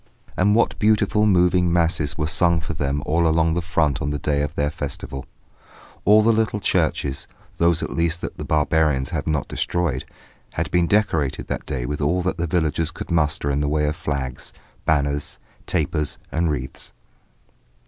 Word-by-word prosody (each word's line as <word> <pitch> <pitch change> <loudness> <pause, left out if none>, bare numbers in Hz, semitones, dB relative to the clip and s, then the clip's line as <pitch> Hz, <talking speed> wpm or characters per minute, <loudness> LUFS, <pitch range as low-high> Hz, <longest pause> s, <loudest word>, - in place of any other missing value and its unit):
And 100 +3 +3
what 115 - +2
beautiful, 105 0 +3
moving 90 -2 +3
Masses 80 -4 +1
were 75 - 0
sung 85 +1 +3
for 80 0 -5
them 70 -1 -2
all 85 +2 +2
along 80 0 +2
the 85 - 0
front 80 -4 0
on 70 - -1
the 75 - -1
day 70 0 0
of 75 +2 -3
their 75 0 0
festival. 70 -3 -6 0.8
All 105 +2 +6
the 115 +1 +4
little 110 -1 0
churches 70 -7 0 0.3
those 85 -1 +2
at - - -4
least 85 0 0
that - - -6
the - - -3
barbarians 75 -3 +1
have 80 -4 -3
not 75 -2 0
destroyed 85 -7 -1 0.5
had - - -2
been 90 -1 +3
decorated 80 - +1
that - - -4
day 60 -2 -3
with 75 +4 -3
all 85 +5 +1
that 95 0 -1
the 85 0 -1
villages 80 -1 0
could 90 - -8
muster 75 -2 +1
in 70 - 0
the 75 0 0
way 75 0 +1
of 75 +1 -1
flags, 70 -5 -4 0.3
banners, 75 -1 0 0.3
tapers 75 -1 -1
and 85 +1 +1
wreaths. 65 -4 -4
80 Hz, 180 wpm, -22 LUFS, 75-85 Hz, 0.8 s, All